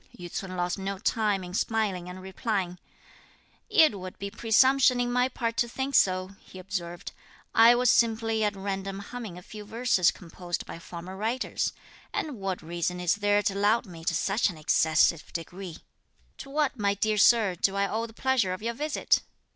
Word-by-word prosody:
Yü 175 -1 -9
ts'un 185 -1 -5
lost 175 +2 -1
no 195 0 -3
time 205 -1 0
in 180 0 -8
smiling 200 -4 -1
and 185 +1 -9
replying. 190 -2 -3 0.9
"It 315 - +5
would 185 0 -8
be 200 0 -5
presumption 250 +4 +4
in 245 0 0
my 250 +1 +2
part 230 -2 -3
to 240 - +1
think 265 +3 -3
so," 185 -4 +3
he - - -14
observed. 180 -2 -5 0.4
"I 230 +2 +7
was 245 0 +4
simply 225 -1 +2
at 210 -1 0
random 195 0 -4
humming 205 -2 -7
a 180 - -11
few 210 +2 -9
verses 225 -4 +2
composed 175 0 -6
by - - -8
former 175 +2 -8
writers, 225 +6 -1 0.4
and 295 -6 -3
what 190 -3 -3
reason 175 +2 -3
is 180 -1 +2
there 205 0 +2
to 200 - +1
laud 210 +4 +2
me 170 -4 -11
to - - +1
such 205 +2 +1
an 175 - -8
excessive 160 +1 +2
degree? 175 0 -6 0.6
To - - -8
what, 285 -3 0
my 200 -1 +1
dear 215 +1 0
Sir, 215 -3 +5
do 195 +3 0
I 200 0 +1
owe 225 +3 -2
the 225 - -15
pleasure 240 -6 +1
of 185 - -7
your 235 +1 -1
visit?" 300 +5 +1
200 Hz, 185 wpm, -27 LUFS, 185-230 Hz, 0.9 s, I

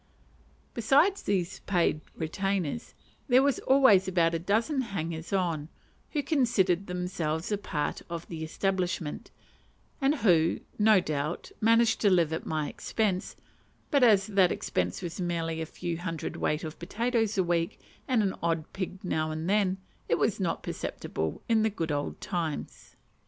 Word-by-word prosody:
Besides 280 - +3
these 190 -3 -1
paid 170 -5 +2
retainers, 190 +4 -2 0.3
there 260 0 +5
was 280 -1 +2
always 260 -9 +5
about 170 -3 +2
a 165 - 0
dozen 225 - +1
hangers 170 -7 -4
on, 170 -6 0 0.4
who 295 -2 -1
considered 215 - +2
themselves 180 -2 -2
apart 160 -8 -2
of 170 0 -5
the 160 -2 -5
establishment, 180 -1 -2 0.7
and 275 +2 +3
who, 170 - +3 0.2
no 210 -2 +6
doubt, 150 +1 -3
managed 230 +1 +4
to 205 - +5
live 170 -4 +3
at 160 - -4
my 155 -2 -1
expense; 205 -4 -2 0.6
but 285 -3 +4
as 205 -5 +6
that 195 -4 +3
expense 90 -1 -2
was 175 +2 -4
merely 165 -2 -2
a 160 - -3
few 170 0 -4
hundredweight 165 -3 -2
of 155 0 -7
potatoes 225 +3 0
a 190 - +4
week, 170 +2 -1 0.3
and 245 -5 +3
an 195 - 0
odd 165 -2 -1
pig 190 +1 -5
now 155 -3 -1
and 155 +1 -4
then, 195 -1 +2 0.3
it - - +3
was - - +1
not - - -1
perceptible 80 -1 -4
in 225 -1 +3
the 220 - +3
good 165 -6 -3
old 145 0 -2
times. 165 -5 -4
180 Hz, 150 wpm, -29 LUFS, 165-215 Hz, 0.7 s, no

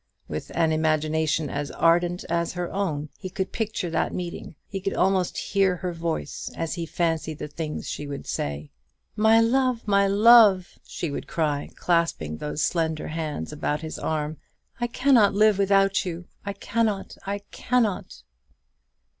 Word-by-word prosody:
With 75 0 -5
an 165 -1 +3
imagination 155 0 +1
as 145 +1 -3
ardent 175 +2 +2
as 170 0 -1
her 180 -1 -4
own, 155 -7 -2
he 185 - -6
could 190 0 -3
picture 215 -6 -2
that - - 0
meeting; 175 -2 -6
he 195 -1 -5
could 195 - -2
almost 185 -1 +1
hear 195 -2 +1
her 180 0 -4
voice 165 -1 -3
as 165 -1 -2
he 170 -1 -4
fancied 160 -2 -1
the - - -5
things 150 +1 -5
she 145 - -4
would 140 -1 -6
say. 75 +1 -4 0.4
"My 220 +1 +5
love, 245 0 +2
my 200 -1 +4
love!" 205 -2 +6
she 165 - -4
would - - -5
cry, 150 -3 -1
clasping 165 - 0
those 150 0 -1
slender 160 -2 -1
hands 155 - -4
about 150 0 -2
his 160 -1 -6
arm; 155 0 -2 0.4
"I 240 - 0
cannot 240 -5 +4
live 210 -1 +4
without 195 0 +3
you: 175 -2 -5 0.2
I 200 - -3
cannot, 210 0 -1
I 200 0 -2
cannot!" 210 - -1
175 Hz, 155 wpm, -25 LUFS, 155-200 Hz, 0.4 s, love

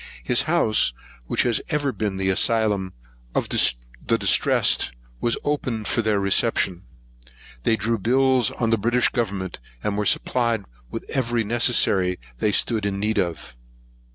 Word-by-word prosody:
His - - +3
house, 110 - +3 0.3
which - - +1
has 120 -3 +2
ever 145 -3 0
been 105 -5 -3
the 95 0 0
asylum 105 -2 +1 0.4
of - - -1
the - - 0
distressed, - - +2 0.3
was 120 - +1
open 130 -7 -2
for 115 - 0
their 105 -2 +1
reception. 100 -2 +1 0.8
They 110 - +2
drew 115 +2 -1
bills 130 +2 +2
on 115 -2 -2
the 115 - +2
British 120 +3 +2
government, 100 -6 -3 0.2
and 105 - -1
were 105 - 0
supplied 115 -4 +1 0.3
with - - -7
every 120 -3 0
necessary 100 -5 +2 0.2
they 105 - +1
stood 110 +1 +1
in 100 -1 -3
need 105 +1 0
of. 85 -8 -4
110 Hz, 145 wpm, -23 LUFS, 95-120 Hz, 0.8 s, His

